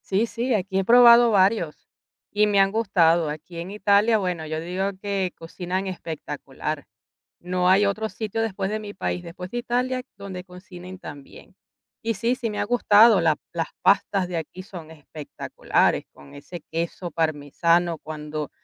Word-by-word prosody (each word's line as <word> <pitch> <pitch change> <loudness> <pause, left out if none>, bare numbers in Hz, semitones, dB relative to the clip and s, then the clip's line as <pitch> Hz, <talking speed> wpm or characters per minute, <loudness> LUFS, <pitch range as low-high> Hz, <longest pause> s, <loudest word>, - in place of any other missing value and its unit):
Sí, 200 +4 +2
sí, 240 +2 -2
aquí 195 -2 0
he - - +1
probado 235 +2 +7
varios, 190 -5 +1 0.4
y 210 +1 +3
me 205 -1 +2
han 195 0 +4
gustado. 175 -7 +2
Aquí, 155 +3 -8
en 170 +2 -6
Italia, 210 +2 +3
bueno, 180 -5 -2
yo 155 0 -3
digo 180 +4 -2
que 195 -3 -1
cocinan 180 +3 -4
espectacular. 155 -4 -5 0.6
No 180 0 0
hay 195 +2 +5
otro 215 +2 -1
sitio, 225 0 -3
después 195 -3 -2
de 215 - -2
mi 210 -1 -8
país, 180 - -3
después 180 +2 -8
de 240 - -3
Italia, 250 +1 -1
donde 190 -2 -8
cocinen 180 0 -11
tan 145 -5 -9
bien. - - -16 0.5
Y 230 0 -1
sí, 230 +5 0
sí 245 -3 -3
me 210 - -5
ha - - +1
gustado, 220 -2 +5
la 160 -2 +2 0.2
las 165 -1 -2
pastas 195 -1 +2
de 180 - -4
aquí 165 +3 -6
son 180 -6 -10
espectaculares, 155 -1 -2
con 70 0 -16
ese 150 +5 -9
queso 170 +2 -3
parmesano, 165 +2 +1
cuando 150 -1 -6
185 Hz, 165 wpm, -24 LUFS, 165-210 Hz, 0.6 s, probado